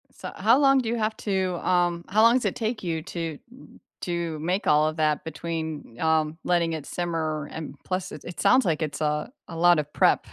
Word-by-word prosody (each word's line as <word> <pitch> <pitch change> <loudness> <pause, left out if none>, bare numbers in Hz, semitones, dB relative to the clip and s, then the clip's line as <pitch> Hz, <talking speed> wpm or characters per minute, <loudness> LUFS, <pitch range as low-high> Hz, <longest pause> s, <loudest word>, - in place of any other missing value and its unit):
So, - - -8
how 230 +4 +4
long 275 -1 +5
do 240 -3 -2
you 235 - 0
have 220 0 -1
to, 190 -3 -1
um 175 -1 +2
how 210 +3 +3
long 230 +2 +6
does 255 - +1
it - - 0
take 225 -1 -3
you 165 -3 -2
to, 165 -4 -5
mm, 260 - -16 0.2
to 170 -3 -3
make 180 +6 -1
all 150 +1 +4
of 155 - -2
that 155 -2 +1
between, 160 -5 -5
um, 160 -1 +1
letting 170 -2 +1
it 155 -3 -5
simmer, 160 -4 -2
and 155 -3 -7
plus, 185 0 -3
it 150 - -9
it 175 - -8
sounds 255 0 +5
like 165 -3 0
it's, 155 -2 -3
uh, 150 +3 0 0.2
a 165 - -8
lot 175 0 +5
of 150 0 -4
prep. - - +3
170 Hz, 220 wpm, -25 LUFS, 155-190 Hz, 0.2 s, long